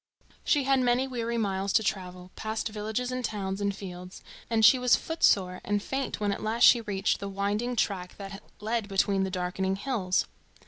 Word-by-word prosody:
She 290 -3 +2
had 270 0 +3
many 250 +1 +2
weary 235 -2 -2
miles 195 -2 -1
to 220 - +4
travel, 180 -2 -4
past 220 +1 -3
villages 220 +4 -3
and 255 0 -3
towns 200 -3 -3
and 200 0 +1
fields, 180 -1 -9 0.3
and 225 -1 +4
she 255 +4 +7
was 250 -1 +5
footsore 190 - +1
and 205 +1 0
faint 270 +6 -3
when 205 -1 0
at 200 - -3
last 225 +2 0
she 240 - +8
reached 205 -3 -1
the 200 - -5
winding 205 +5 -1
track 190 -5 -2
that 195 0 -8 0.2
led 220 0 -2
between 195 0 +1
the - - -3
darkening 185 +1 -1
hills. 200 -4 0
205 Hz, 185 wpm, -28 LUFS, 190-235 Hz, 0.3 s, she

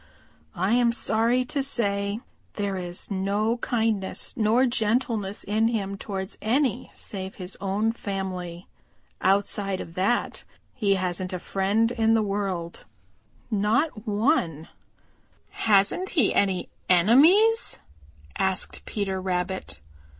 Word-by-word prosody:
I 190 +5 +1
am 240 -1 +4
sorry 235 +2 +1
to 280 +2 -2
say 200 -6 0 0.4
that 205 - -4
there 200 -1 -1
is 175 +1 -3
no 200 +4 0
kindness 225 -5 -1
nor 230 +2 +3
gentleness 225 -3 0
in 215 +2 +1
him 200 -4 -2
towards 195 -1 -6
any 250 +1 0
save 190 -1 -6
his 185 0 -6
own 200 +3 0
family. 190 -5 -5 0.5
Outside 195 0 +1
of 165 - -8
that 195 +7 0 0.3
he 200 -5 +1
hasn't 185 0 -2
a - - -1
friend 200 +5 0
in 225 -2 +2
the 220 - +2
world, 195 -4 -3 0.7
not 220 +3 0
one." 205 - 0 0.8
"Hasn't 210 - +2
he 285 - +2
any 190 -2 +1 0.2
enemies?" 310 - +5 0.6
asked 190 -1 0
Peter 195 -3 -2
Rabbit. 185 - -3
205 Hz, 115 wpm, -25 LUFS, 190-230 Hz, 0.8 s, enemies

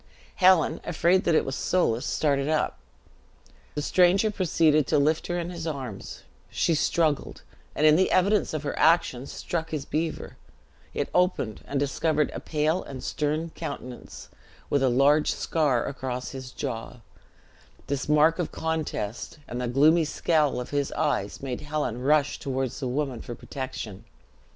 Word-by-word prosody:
Helen, 185 -3 +4
afraid 175 +3 +2
that 170 - +3
it - - +3
was 135 - -3
Soulis, 135 -8 0
started 140 -1 +1
up. 155 - 0 1.0
The 150 - -2
stranger 185 +6 +4
proceeded 160 -6 +2
to - - +2
lift 155 +2 +1
her 175 - -1
in 175 0 -3
his 170 -2 -5
arms; 130 -9 -6 0.3
she 165 - +1
struggled, 155 -1 0 0.3
and 155 - +2
in 155 0 +7
the 190 - +3
evidence 195 +2 +2
of 155 - -3
her 145 - -2
action, 140 -6 +3
struck 165 -2 -4
his 155 -3 -4
beaver; 160 +2 -3 0.6
it - - -1
opened, 180 - +1
and 140 - -1
discovered 150 +2 0
a - - -4
pale 155 +3 0
and 130 -2 -8
stern 155 +2 -2
countenance, 130 -5 -8 0.4
with 145 - +2
a 135 - +3
large 140 +5 +4
scar 145 -7 0
across 125 -2 -4
his 130 -2 -7
jaw; 120 -2 -5 0.8
this 140 +1 -3
mark 155 +3 +4
of 175 - -2
contest, 155 -8 -3
and 120 +1 -4
the 125 - -1
gloomy 155 +7 +4
scowl 150 -3 +1
of 125 - -6
his 145 -1 -1
eyes, 100 +6 -1
made 130 -3 -4
Helen 145 -5 -3
rush 145 +2 +2
toward 130 -2 -2
the 135 - -5
woman 130 -1 -2
for 120 - -7
protection. 125 -8 -7
150 Hz, 155 wpm, -26 LUFS, 130-160 Hz, 1.0 s, in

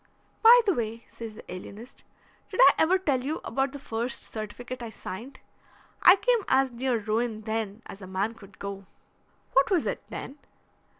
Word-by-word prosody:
"By 475 +2 +9
the 395 - +3
way," 230 -3 -4
says 225 -2 -9
the - - -12
alienist, 215 +7 -10 0.5
"did - - -6
I - - +9
ever 355 +4 +4
tell 280 -9 0
you 300 +4 -2
about 270 0 0
the 285 - -7
first 235 -2 -4
certificate 240 +4 -7
I 235 - -5
signed? 225 +5 -8 0.6
I 360 - +9
came 485 +4 +2
as 265 0 +3
near 245 0 0
ruin 220 +1 -1
then 220 0 -3
as 195 - -10
a 185 - -8
man 195 +4 -1
could 200 -4 -16
go." 195 -1 -7 0.7
"What 270 +1 +4
was 360 -6 +2
it, - - -2
then?" 285 - -7
235 Hz, 175 wpm, -27 LUFS, 215-275 Hz, 0.7 s, By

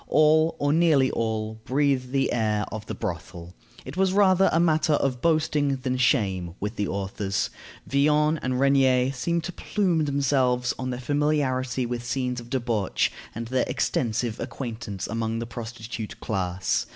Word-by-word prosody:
All, 155 -3 +4
or 145 0 +1
nearly 155 -5 +4
all, 110 -1 -2
breathe 135 -1 +1
the 135 0 +1
air 105 -2 +1
of 110 0 -6
the - - -4
brothel. 90 -3 -6 0.3
It 130 - -7
was 190 0 +2
rather 195 -1 +5
a 165 - +2
matter 160 -2 +3
of 130 -4 0
boasting 150 -3 +2
than 130 -1 -2
of 130 - -1
shame 95 - +1
with 105 +3 -3
the 105 -2 -1
authors. 100 0 -2 0.3
Villon 150 +2 +2
and 130 0 -1
Regnier 135 -2 +4
seem 170 +6 -1
to 170 - -5
plume 175 -7 0
themselves 130 -3 +1
on 130 0 -3
their 125 -1 -3
familiarity 130 -2 0
with 120 0 -4
scenes 125 0 -2
of 120 0 -11
debauch, 120 -6 0 0.2
and 115 0 -5
their 130 -1 +1
extensive 115 -1 -1
acquaintance 115 -5 -5
among 115 0 -2
the 115 - -3
prostitute 115 -1 -7
class. 95 -2 -1
125 Hz, 160 wpm, -25 LUFS, 110-145 Hz, 0.3 s, rather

